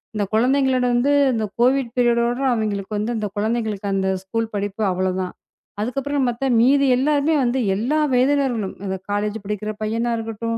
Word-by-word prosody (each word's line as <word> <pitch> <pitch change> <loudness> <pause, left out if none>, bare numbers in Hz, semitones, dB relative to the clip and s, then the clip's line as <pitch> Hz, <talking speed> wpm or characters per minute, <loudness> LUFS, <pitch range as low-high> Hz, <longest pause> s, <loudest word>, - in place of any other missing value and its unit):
இந்தக் 205 -1 -2
குழந்தைகளோட 260 +2 +2
வந்து 265 +4 +2 0.2
இந்தக் 215 -3 -3
கோவிட் 255 -1 +2
பீரியடோட 240 +1 +2
அவிங்களுக்கு 210 -3 -2
வந்து 215 +3 -1
அந்தக் 210 -3 -4
குழந்தைகளுக்கு 215 -2 -1
அந்த 190 0 0
ஸ்கூல் 225 +3 -3
படிப்பு 205 +1 -2
அவ்ளோதான். 185 0 -2 0.5
அதுக்கப்புறம் 275 +4 -1
பாத்தா 240 +3 -3 0.2
மீதி 275 +3 +4
எல்லாருமே 295 +3 +2
வந்து 245 +2 0 0.2
எல்லா 250 +10 0
வயதினர்களும் 255 -5 +1
இந்த 190 -1 -2 0.2
காலேஜ் 205 +1 -1
படிக்கிற 210 +1 -3
பையனா 230 +2 -1
இருக்கட்டும் 225 0 -3
230 Hz, 150 wpm, -21 LUFS, 210-255 Hz, 0.5 s, மீதி